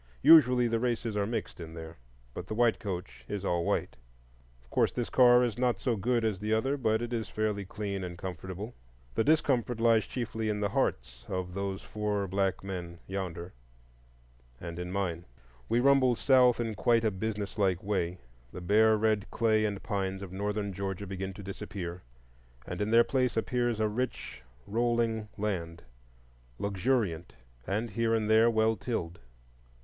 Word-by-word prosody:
Usually 125 -6 +7
the 115 0 0
races 115 -2 -1
are 100 -1 0
mixed 115 -4 -4
in 80 -1 -8
there; 80 0 -8 0.4
but 90 - -7
the 110 - -4
white 120 -1 +3
coach 95 -3 -6
is 100 -1 -4
all 85 -2 +1
white. - - -1 0.7
Of - - -27
course - - +2
this 120 -2 -3
car 125 -1 +6
is 120 -2 -2
not 125 -1 +1
so 125 -4 0
good 115 +3 0
as 105 -4 -1
the 105 +2 +1
other, 135 +5 +1
but 110 -4 +1
it 120 0 -4
is 115 -2 -2
fairly 105 -2 -1
clean 100 -1 -4
and 90 -1 -6
comfortable. 95 +4 -6 0.4
The 110 - +1
discomfort 130 -6 +2
lies 115 -1 +4
chiefly 115 -3 -3
in 105 -1 -1
the 100 -1 0
hearts 60 -8 -1
of 90 -1 -3
those 100 0 -3
four 105 -2 -2
black 95 0 0
men 90 -3 -6
yonder—and - - -9
in 90 0 -4
mine. 90 -3 -2 0.5
We 120 - +3
rumble 130 -1 +4
south 125 -1 +4
in 115 -2 -1
quite 115 +3 +2
a 110 - +3
business 105 0 -4
like 95 -3 +1
way. 95 -3 -1 0.3
The - - -7
bare 110 +4 +4
red 110 -1 +1
clay 110 -2 +2
and 100 -2 -3
pines 95 -1 -2
of 95 - -8
Northern 100 +1 -2
Georgia 95 +1 -4
begin 95 0 -4
to 100 - -10
disappear, 90 -2 -6 0.6
and - - -5
in 105 - 0
their 115 +1 +6
place 125 -3 0
appears 120 -1 0
a 110 - +2
rich 115 - -4 0.2
rolling 115 -1 0
land, 85 -6 -3 0.7
luxuriant, 100 - -1 0.3
and 110 +3 -1
here 115 +2 +1
and 110 -1 0
there 110 +2 +5
well 110 0 +2
tilled. 90 -6 -4
105 Hz, 170 wpm, -30 LUFS, 95-115 Hz, 0.7 s, Usually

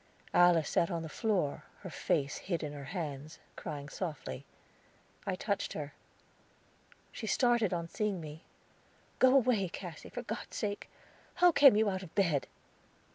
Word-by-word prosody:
Alice 175 -3 +6
sat 170 - +2
on 170 -3 -2
the 160 - -6
floor, 190 -8 0 0.2
her - - -7
face 140 +1 0
hid 170 -4 -3
in 150 -1 -4
her 140 -1 -7
hands, 150 0 -5 0.2
crying 145 -1 -6
softly. 150 - -5 0.8
I 190 - +1
touched 200 +1 -2
her. 145 -1 -5 1.2
She 220 - -6
started 240 -3 +3
on 170 -2 -2
seeing 205 +1 -1
me. 155 0 -8 0.8
"Go 260 +1 +6
away, 230 -8 +3
Cassy, 175 -3 -8
for 245 - -5
God's 220 0 -5
sake! 205 -2 -3 0.5
How 355 0 +6
came 280 -7 +8
you 215 +1 +3
out 190 -2 -1
of 180 -4 -11
bed?" 170 -9 +2
180 Hz, 150 wpm, -32 LUFS, 155-215 Hz, 1.2 s, came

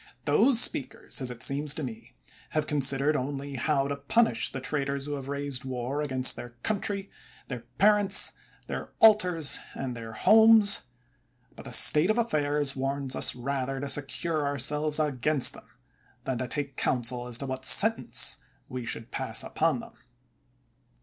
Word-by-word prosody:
Those 225 - +4
speakers, 135 - -1
as 130 - -1
it 120 -2 -5
seems 145 +3 0
to 155 - -5
me, 120 -4 -9 0.4
have 155 - +1
consid 140 -2 +3
ered 150 +2 +1
only 140 0 -4
how 135 +1 0
to 140 - -3
punish 140 - +1
the 135 - -5
traitors 140 0 -3
who 145 - -4
have 135 -2 -6
raised 140 -2 -4
war 130 +2 -4
against 130 -3 +1
their 120 0 -10
country, 200 -2 -2 0.4
their 125 -3 -5 0.2
parents, 205 -1 +4 0.3
their - - -6
altars, 180 -8 +4 0.2
and 130 -2 -5
their 115 -1 -8
homes; 220 - +5 0.7
but - - -12
the - - -8
state 155 +5 +5
of 215 - +1
af 235 -1 0
fairs 145 -2 0
warns 135 0 -3
us - - +2
rather 135 +1 -3
to 140 - -4
secure 150 +3 -2
ourselves 150 +2 -1
against 150 -1 +1
them, - - -15 0.5
than 130 -3 -3
to 130 - -3
take 140 +1 -4
counsel 125 0 -1
as 120 -2 -1
to 140 - -4
what 130 -1 -5
sentence - - +3 0.3
we 125 -1 -6
should 115 0 -4
pass 125 -4 -1
upon 165 +8 -1
them. 230 0 -13
140 Hz, 165 wpm, -27 LUFS, 130-155 Hz, 0.7 s, homes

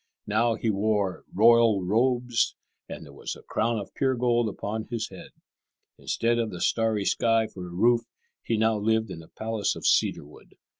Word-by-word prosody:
Now 115 +2 +1
he 115 0 -1
wore 100 -2 -1
royal 115 -1 +5
robes, 120 +3 +1 0.3
and - - -8
there 70 - -14
was - - -6
a - - -15
crown 115 +1 -1
of 100 - -7
pure 130 -2 +1
gold 120 -2 +1
upon 110 +2 -5
his 115 -2 -4
head. - - -11 0.7
Instead 120 +1 0
of 115 -2 -1
the 90 - -7
starry 110 -1 0
sky 115 +1 +2
for 90 -4 -9
a - - -10
roof, 115 +6 +3 0.4
he 115 - -1
now 110 0 +2
lived 110 0 0
in 80 - -7
a 80 - -15
palace 110 -1 -2
of - - -8
cedar - - +2
wood. 75 - -17
110 Hz, 185 wpm, -26 LUFS, 105-115 Hz, 0.7 s, royal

